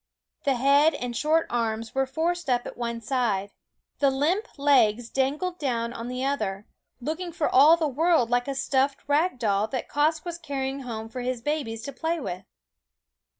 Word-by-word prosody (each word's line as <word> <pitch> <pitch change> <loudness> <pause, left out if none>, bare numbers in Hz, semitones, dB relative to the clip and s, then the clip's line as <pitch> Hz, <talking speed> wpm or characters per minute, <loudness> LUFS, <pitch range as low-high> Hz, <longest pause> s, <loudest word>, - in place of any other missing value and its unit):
The 275 -2 +3
head 280 +5 +4
and 245 -3 -4
short 315 +5 +2
arms 225 -1 -2
were 270 0 +1
forced 330 +4 -1
up 245 -1 +1
at - - -7
one 235 -1 -4
side, 215 -5 -1 0.5
the 280 - +4
limp 320 - 0
legs 245 -5 +3
dangled 300 +7 -1
down 235 -5 -1
on 230 0 -6
the 250 +1 -3
other, 210 -8 -2 0.3
looking 320 +7 -4
for 320 -2 -1
all 300 +6 +7
the 320 -2 0
world 295 -3 +2
like 245 +1 +1
a 275 - -2
stuffed 275 0 0
rag 295 +2 +2
doll 210 -2 +1
that 255 +2 -4
Quoskh 310 +2 +1
was 340 -1 -5
carrying 275 -3 -3
home 225 -4 -6
for 250 +3 -6
his 250 0 -2
babies 250 -7 -2
to 280 - -6
play 325 +4 -2
with. 185 - -5
270 Hz, 180 wpm, -26 LUFS, 235-300 Hz, 0.5 s, all